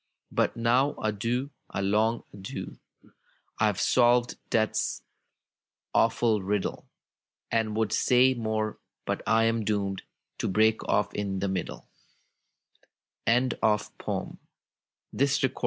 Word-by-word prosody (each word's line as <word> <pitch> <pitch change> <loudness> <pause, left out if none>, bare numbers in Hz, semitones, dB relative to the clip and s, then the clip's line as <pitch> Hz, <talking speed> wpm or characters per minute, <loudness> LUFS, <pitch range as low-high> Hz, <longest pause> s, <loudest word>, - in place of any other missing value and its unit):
"But - - 0
now, 125 +5 +2
adieu 115 +6 -2
— - - -47
a - - -1
long 110 +4 +1
adieu 100 -1 -7 0.8
I 110 - +4
IVe 100 - -3
solved 120 0 +3
death's 110 -1 0 0.9
awful 115 -2 +3
riddle, 100 +1 -2 0.6
A)nd 110 -2 0
would 110 -1 0
say 130 +1 +4
more, 110 -3 -2 0.3
but - - -2
I 115 0 +4
am 115 0 +1
doomed 100 -2 -1 0.4
To - - -1
break 110 +3 +3
off 105 -1 +1
in 100 -2 -2
the 100 +1 -1
middle 95 -2 -4 1.4
I 125 +2 +4
" - - -33
Thomas 105 -1 +2
Hood. 140 -1 -3
110 Hz, 120 wpm, -28 LUFS, 105-120 Hz, 1.4 s, I